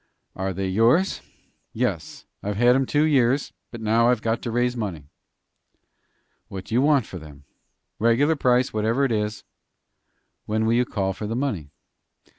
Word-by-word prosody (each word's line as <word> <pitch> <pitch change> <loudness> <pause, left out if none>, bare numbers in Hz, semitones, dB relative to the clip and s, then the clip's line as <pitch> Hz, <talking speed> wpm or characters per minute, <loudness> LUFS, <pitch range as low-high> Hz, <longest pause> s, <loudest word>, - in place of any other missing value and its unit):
"Are 95 +1 -2
they 95 +1 -3
yours?" 115 - +2 0.5
"Yes; - - -3 0.2
I've 105 0 -3
had 120 +2 +5
'em 135 -1 +1
two 145 +1 +2
years, 140 -3 +2 0.2
but 120 - -9
now 115 +2 +3
I've 125 -3 +1
got 115 0 -1
to 120 - -4
raise 120 +1 0
money." 85 - -5 1.4
"What 95 -1 -8
do - - -8
you 120 - +3
want 140 -4 +3
for 90 - -8
them?" 75 -3 -13 0.6
"Regular 120 +8 +3
price, 125 -2 +2
whatever 110 +6 +1
it 130 - -1
is." 105 -1 -2 1.0
"When 110 +1 0
will 115 - +2
you 125 +1 +3
call 95 -5 -2
for 105 +2 -6
the 115 - -3
money?" 110 - -2
115 Hz, 165 wpm, -24 LUFS, 105-125 Hz, 1.4 s, had